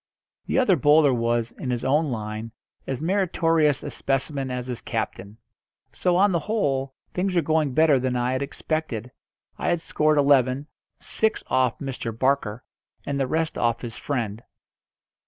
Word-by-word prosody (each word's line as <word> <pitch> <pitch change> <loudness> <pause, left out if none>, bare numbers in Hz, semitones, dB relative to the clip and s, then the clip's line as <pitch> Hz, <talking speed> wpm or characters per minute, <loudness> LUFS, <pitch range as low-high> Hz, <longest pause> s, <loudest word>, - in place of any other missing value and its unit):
The - - 0
other 250 -8 +4
bowler 145 -1 +5
was, 120 -1 0
in 130 - -6
his 120 0 -2
own 150 +3 +2
line, 110 -1 -4 0.4
as 135 +2 -3
meritorious 165 -5 +2
a - - -5
specimen 135 0 -1
as 125 -1 -3
his 125 -2 -5
captain. 100 +3 -4 0.6
So, 180 -1 +1
on 200 +2 +4
the 170 - +1
whole, 140 -11 -1 0.2
things 185 +1 -1
were 170 - +3
going 155 -3 +1
better 155 -4 +5
than 125 0 -1
I 125 +1 0
had 130 +1 -1
expected. 140 -4 -3 0.5
I - - -2
had 175 - +2
scored 155 -1 +1
eleven, 140 -1 +3 0.3
six 220 0 0
off 130 -2 +1
Mr. 125 -5 -5
Barker, 125 -4 0 0.4
and 140 -1 -2
the 135 - +1
rest 160 +3 -1
off 115 -1 +1
his 115 -2 -5
friend. 115 -6 -3
135 Hz, 160 wpm, -24 LUFS, 125-160 Hz, 0.6 s, bowler